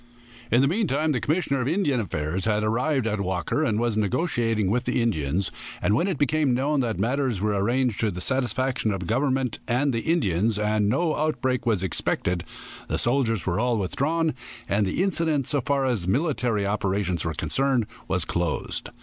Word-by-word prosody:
In 120 Hz, -, +4 dB
the -, -, +4 dB
meantime 160 Hz, -, +1 dB
the 130 Hz, -, +1 dB
commissioner 145 Hz, -3 st, 0 dB
of 125 Hz, -, -1 dB
Indian 150 Hz, -6 st, +1 dB
affairs 85 Hz, -2 st, -2 dB
had 105 Hz, -1 st, +1 dB
arrived 125 Hz, +4 st, +1 dB
at 105 Hz, -2 st, -1 dB
Walker, 95 Hz, -, -1 dB
and 110 Hz, -7 st, +1 dB
was 120 Hz, -2 st, 0 dB
negotiating 110 Hz, -, 0 dB
with 120 Hz, +2 st, 0 dB
the 125 Hz, -, 0 dB
Indians, 95 Hz, -, 0 dB, 0.3 s
and 105 Hz, -, +1 dB
when 145 Hz, -, +2 dB
it 185 Hz, -6 st, -1 dB
became 145 Hz, -2 st, +2 dB
known 140 Hz, +3 st, +1 dB
that 115 Hz, -4 st, -1 dB
matters 125 Hz, +1 st, 0 dB
were 105 Hz, +1 st, 0 dB
arranged 120 Hz, +3 st, +1 dB
to 110 Hz, -, +1 dB
the 90 Hz, -2 st, -5 dB
satisfaction 130 Hz, 0 st, 0 dB
of 100 Hz, -2 st, -3 dB
the -, -, -4 dB
government 130 Hz, +1 st, 0 dB
and 130 Hz, +3 st, +1 dB
the 115 Hz, -, 0 dB
Indians 110 Hz, -, +1 dB
and 105 Hz, -1 st, +1 dB
no 155 Hz, +7 st, +1 dB
outbreak 130 Hz, -5 st, -1 dB
was 105 Hz, -5 st, +2 dB
expected 90 Hz, 0 st, -1 dB, 0.4 s
the -, -, -1 dB
soldiers 120 Hz, -, +1 dB
were 90 Hz, +2 st, 0 dB
all 120 Hz, 0 st, +1 dB
withdrawn, 155 Hz, -, 0 dB, 0.3 s
and 100 Hz, 0 st, +1 dB
the 135 Hz, -, 0 dB
incident, 160 Hz, -8 st, 0 dB
so 145 Hz, -2 st, +1 dB
far 140 Hz, +1 st, 0 dB
as 115 Hz, -9 st, 0 dB
military 125 Hz, -, +1 dB
operations 100 Hz, -4 st, -1 dB
were 85 Hz, -1 st, -2 dB
concerned, 125 Hz, -, +1 dB, 0.2 s
was 90 Hz, -2 st, 0 dB
closed. 85 Hz, -3 st, -2 dB
120 Hz, 185 wpm, -25 LUFS, 100-140 Hz, 0.4 s, In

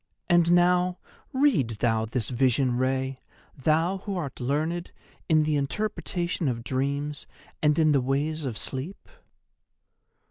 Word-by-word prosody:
And 175 Hz, -1 st, +4 dB
now 180 Hz, +1 st, +3 dB, 0.3 s
read 200 Hz, -, +2 dB
thou 110 Hz, -2 st, +1 dB
this 115 Hz, 0 st, -2 dB
vision, 130 Hz, 0 st, +2 dB
Rei, 130 Hz, +1 st, -1 dB, 0.4 s
thou 160 Hz, +7 st, +1 dB
who 195 Hz, 0 st, -4 dB
art 140 Hz, -7 st, -5 dB
learned 155 Hz, +7 st, -1 dB, 0.4 s
in 155 Hz, -1 st, +5 dB
the 150 Hz, 0 st, +1 dB
interpretation 175 Hz, +2 st, -2 dB
of 115 Hz, -3 st, -2 dB
dreams 140 Hz, +3 st, -2 dB, 0.3 s
and 150 Hz, -1 st, +3 dB
in 155 Hz, -2 st, +4 dB
the 140 Hz, -2 st, +3 dB
ways 145 Hz, +5 st, -1 dB
of 125 Hz, -6 st, -3 dB
sleep. 140 Hz, +9 st, -5 dB
145 Hz, 130 wpm, -26 LUFS, 130-175 Hz, 0.4 s, in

